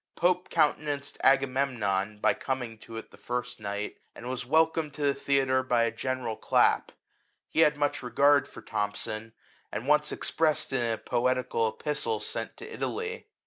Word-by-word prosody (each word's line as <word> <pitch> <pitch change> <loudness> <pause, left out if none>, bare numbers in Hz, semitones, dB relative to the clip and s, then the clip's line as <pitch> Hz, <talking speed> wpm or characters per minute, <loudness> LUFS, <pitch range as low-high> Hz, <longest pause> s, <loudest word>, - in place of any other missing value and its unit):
Pope 180 +1 +1
countenanced 145 -1 0
Agamemnon,'' 125 -7 +2
by - - +3
coming 125 -4 -4
to 115 +1 -9
it 115 - -8
the - - -15
first 125 0 -4
night, 100 -1 -4 0.2
and 120 - -8
was 125 -1 -4
welcomed 160 0 +2
to 150 - -4
the 140 -1 +3
theatre 135 -2 +2
by 120 -2 +2
a 115 - +1
general 125 -1 -3
clap; - - +2 0.6
he - - -2
had 150 -2 +5
much 145 0 0
regard 140 +3 +4
for 110 - -12
Thom 105 -2 -2
son, 110 +2 -3 0.4
and 120 - -4
once 150 0 +3
expressed 155 -4 0
it - - +3
in 115 -1 +1
a - - -3
poetical 125 -1 0
Epistle 115 -2 -1
sent 115 +1 -3
to 450 +3 -9
Italy. 455 0 -4
130 Hz, 170 wpm, -28 LUFS, 115-145 Hz, 0.6 s, had